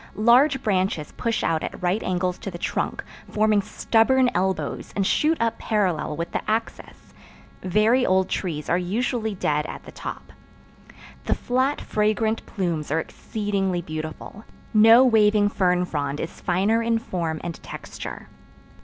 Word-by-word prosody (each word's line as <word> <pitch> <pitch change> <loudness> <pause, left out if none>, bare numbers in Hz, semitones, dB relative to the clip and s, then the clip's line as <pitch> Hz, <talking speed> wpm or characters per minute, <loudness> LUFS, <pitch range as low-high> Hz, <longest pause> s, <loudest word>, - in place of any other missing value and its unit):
Large 260 +5 +4
branches 185 -7 0
push 230 -2 -2
out 160 -1 +1
at - - -5
right 180 +4 0
angles 180 0 -1
to - - -5
the 175 - -7
trunk, - - -2 0.3
forming 215 -1 +2
stubborn 245 +5 +2
elbows 190 +1 -2
and 195 - +1
shoot 315 +10 +2
up 230 0 0
parallel 185 -8 0
with 170 +1 -4
the - - -1
axis. 225 +1 -4 0.5
Very 215 +7 +3
old 190 -4 +2
trees 155 -6 -3
are 175 - +2
usually 220 +3 -1
dead 150 -4 0
at - - -8
the - - -11
top. - - -8 0.9
The - - +1
flat 260 +3 0
fragrant 215 +1 0
plumes 170 -6 -2
are 155 +3 +1
exceedingly 195 -2 -2
beautiful: 155 +6 -7 0.3
no 225 +4 +7
waving 210 -3 +4
fern 180 -3 +1
frond 145 -3 -3
is 165 - -6
finer 195 +6 +1
in 230 0 +1
form 170 -8 -3
and 170 -2 -6
texture. - - -8
200 Hz, 145 wpm, -24 LUFS, 175-225 Hz, 0.9 s, no